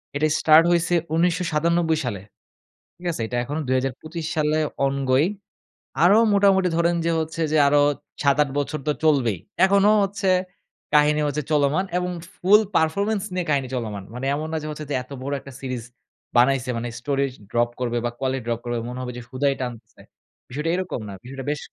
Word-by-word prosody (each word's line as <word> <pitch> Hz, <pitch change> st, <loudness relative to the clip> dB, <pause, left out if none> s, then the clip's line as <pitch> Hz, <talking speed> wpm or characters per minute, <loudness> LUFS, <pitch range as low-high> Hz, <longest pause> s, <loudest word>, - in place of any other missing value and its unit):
এটা 150 Hz, +2 st, +2 dB
স্টার্ট 160 Hz, +1 st, +7 dB
হইছে 175 Hz, +1 st, +2 dB, 0.2 s
১৯৯৭ 170 Hz, -1 st, +1 dB
সালে। 100 Hz, -6 st, -3 dB, 0.8 s
ঠিক 175 Hz, -, -13 dB
আছে? 135 Hz, -, -5 dB
এটা 120 Hz, -, -3 dB
এখনো 145 Hz, +5 st, -4 dB
২০২৫ 135 Hz, +6 st, -2 dB
সালে 155 Hz, 0 st, +1 dB, 0.3 s
অনগোইং। 135 Hz, +3 st, +1 dB, 0.7 s
আরো 200 Hz, +5 st, +6 dB, 0.2 s
মোটামুটি 195 Hz, -2 st, +4 dB
ধরেন 170 Hz, 0 st, +2 dB
যে 170 Hz, -, +2 dB
হচ্ছে 160 Hz, +1 st, -4 dB
যে, 155 Hz, -, +3 dB
আরো 145 Hz, 0 st, +4 dB, 0.4 s
৭-৮ 140 Hz, 0 st, +3 dB
বছর 150 Hz, +2 st, -3 dB
তো -, -, +3 dB
চলবেই। 130 Hz, -, +3 dB, 0.3 s
এখনো 200 Hz, +1 st, +4 dB
হচ্ছে 195 Hz, 0 st, -1 dB, 0.6 s
কাহিনী 150 Hz, 0 st, +4 dB
হচ্ছে 150 Hz, +1 st, -2 dB
চলমান 150 Hz, +5 st, +2 dB
এবং 180 Hz, 0 st, -1 dB, 0.2 s
ফুল 205 Hz, +4 st, +5 dB, 0.2 s
পারফরম্যান্স 200 Hz, +6 st, +1 dB
নিয়ে 180 Hz, -2 st, -1 dB
কাহিনী 140 Hz, -3 st, +1 dB
চলমান। 105 Hz, -5 st, -4 dB
মানে 125 Hz, +2 st, -5 dB
এমন 155 Hz, +2 st, -4 dB
না -, -, 0 dB
যে 155 Hz, -, -6 dB
হচ্ছে 150 Hz, 0 st, -7 dB
যে, -, -, -2 dB
এত 130 Hz, -, -23 dB
বড় 140 Hz, +2 st, -3 dB
একটা 140 Hz, -, -12 dB
সিরিজ 130 Hz, -3 st, -4 dB, 0.5 s
বানাইছে। 125 Hz, 0 st, +3 dB
মানে 120 Hz, +1 st, -3 dB
স্টোরি 140 Hz, +2 st, 0 dB
য -, -, -5 dB, 0.2 s
ড্রপ 120 Hz, 0 st, +2 dB
করবে 120 Hz, -1 st, -1 dB
বা 120 Hz, -, -1 dB
কোয়ালিটি 130 Hz, -1 st, -2 dB
ড্রপ 115 Hz, -1 st, -1 dB
করবে, 120 Hz, -1 st, -2 dB
মনে 125 Hz, +1 st, -6 dB
হবে 125 Hz, -, -4 dB
যে -, -, -6 dB
হুদাই 140 Hz, +2 st, +1 dB
টানতেছে, 120 Hz, -3 st, -7 dB, 0.5 s
বিষয়টা 150 Hz, +6 st, -3 dB
এরকম 180 Hz, -10 st, -3 dB
না। 100 Hz, -, -7 dB
বিষয়টা 135 Hz, +1 st, -8 dB
বেশ 150 Hz, -, -3 dB
150 Hz, 175 wpm, -23 LUFS, 130-170 Hz, 0.8 s, স্টার্ট